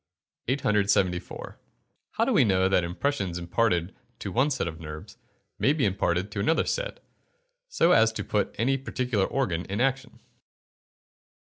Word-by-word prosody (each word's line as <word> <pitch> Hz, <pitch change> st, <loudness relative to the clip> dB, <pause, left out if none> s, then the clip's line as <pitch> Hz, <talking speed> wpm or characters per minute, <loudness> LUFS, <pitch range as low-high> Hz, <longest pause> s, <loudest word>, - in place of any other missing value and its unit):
874. 100 Hz, -8 st, 0 dB, 0.6 s
_How -, -, +3 dB
do -, -, +1 dB
we -, -, +5 dB
know 95 Hz, -4 st, +3 dB
that 95 Hz, -2 st, +2 dB
impressions 95 Hz, 0 st, -2 dB
imparted 90 Hz, 0 st, 0 dB, 0.2 s
to 100 Hz, -, -5 dB
one 130 Hz, +8 st, +2 dB
set 135 Hz, -10 st, -1 dB
of 80 Hz, -1 st, -6 dB
nerves, 75 Hz, -1 st, -9 dB, 0.4 s
may 140 Hz, -, +3 dB
be 150 Hz, -6 st, +1 dB
imparted 95 Hz, 0 st, 0 dB
to 100 Hz, -, -4 dB
another 135 Hz, +11 st, +2 dB
set, -, -, -3 dB, 0.7 s
so 180 Hz, -, +3 dB
as 110 Hz, -7 st, +5 dB
to -, -, -4 dB
put 105 Hz, -, -1 dB
any 135 Hz, +5 st, +1 dB
particular 125 Hz, -6 st, -1 dB
organ 90 Hz, -12 st, -1 dB
in 100 Hz, +3 st, -4 dB
action. 135 Hz, 0 st, -1 dB
105 Hz, 145 wpm, -27 LUFS, 90-130 Hz, 0.7 s, we